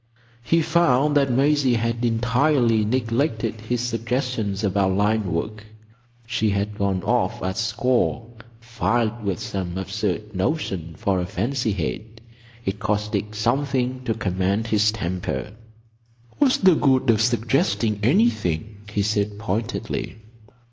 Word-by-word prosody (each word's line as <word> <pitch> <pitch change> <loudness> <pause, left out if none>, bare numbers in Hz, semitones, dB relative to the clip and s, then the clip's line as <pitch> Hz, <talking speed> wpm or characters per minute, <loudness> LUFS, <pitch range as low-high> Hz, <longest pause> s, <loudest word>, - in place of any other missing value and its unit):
He 165 +7 +2
found 150 -3 +3
that 140 -2 +3
Maisie 135 0 +3
had 115 +1 -1
entirely 120 0 +2
neglected 115 -1 -1
his 120 +2 -2
suggestions 115 -3 -2
about 95 -1 +2
line 105 -1 +1
work. 105 +6 -3 0.6
She 110 -2 0
had 100 +1 -1
gone 95 -2 0
off - - 0
at 95 0 -2
score 115 +1 0 0.3
filled 115 0 -1
with 100 -4 -1
some 95 -2 -4
absurd 105 +2 -3
notion 95 - -2
for 100 -5 0
a 90 - -2
"fancy 115 +3 -1
head." 105 - -4 0.5
It 95 +2 -2
cost 105 -1 -1
Dick 105 0 -2
something 130 +2 0
to 115 - 0
command 95 +1 0
his 105 -1 +3
temper. 95 0 -3 0.9
"What's 275 -3 +4
the 190 -2 +5
good 135 -5 +3
of 110 -1 +2
suggesting 115 -3 +1
anything?" 110 - +1
he 105 -1 0
said 105 0 0
pointedly. 105 -2 -3
110 Hz, 125 wpm, -23 LUFS, 100-125 Hz, 0.9 s, the